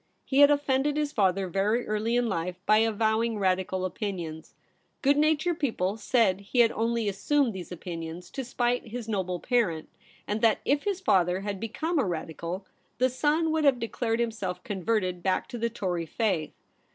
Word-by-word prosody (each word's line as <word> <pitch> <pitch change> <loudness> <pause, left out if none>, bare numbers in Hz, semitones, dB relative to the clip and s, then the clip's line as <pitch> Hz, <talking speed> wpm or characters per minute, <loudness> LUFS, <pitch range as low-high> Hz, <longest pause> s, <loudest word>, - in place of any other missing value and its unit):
He 270 0 +1
had 285 0 +9
offended 285 0 +1
his 300 -1 0
father 195 -6 +1
very 205 +6 0
early 215 +2 0
in 245 -1 +2
life 180 -3 -2
by 215 0 +5
avowing 225 +1 +1
Radical 185 -1 0
opinions. 175 -5 -5 0.5
Good 280 +1 +5
natured 310 +3 +2
people 210 -8 0
said 215 -4 +2
he 205 +5 +1
had 230 -1 +4
only 230 0 0
assumed 230 +6 +1
these 185 -2 -8
opinions 170 0 -7
to 270 - -4
spite 245 0 -1
his 230 0 -6
noble 185 -4 -2
parent, 200 -11 0 0.4
and 210 +1 -2
that 225 -2 +4
if 285 +1 +1
his 395 -2 -1
father 185 - +2
had 200 -1 -4
become 315 - -2
a - - +3
Radical, 170 +1 -4 0.3
the 255 +1 +3
son 305 +5 +1
would 315 -1 +1
have 275 -3 +5
declared 230 0 -2
himself 205 -6 -2
converted 185 -3 -1
back 190 +1 0
to 240 - -6
the 235 +1 0
Tory 180 -7 -3
faith. 185 -7 -1
220 Hz, 175 wpm, -28 LUFS, 185-250 Hz, 0.5 s, had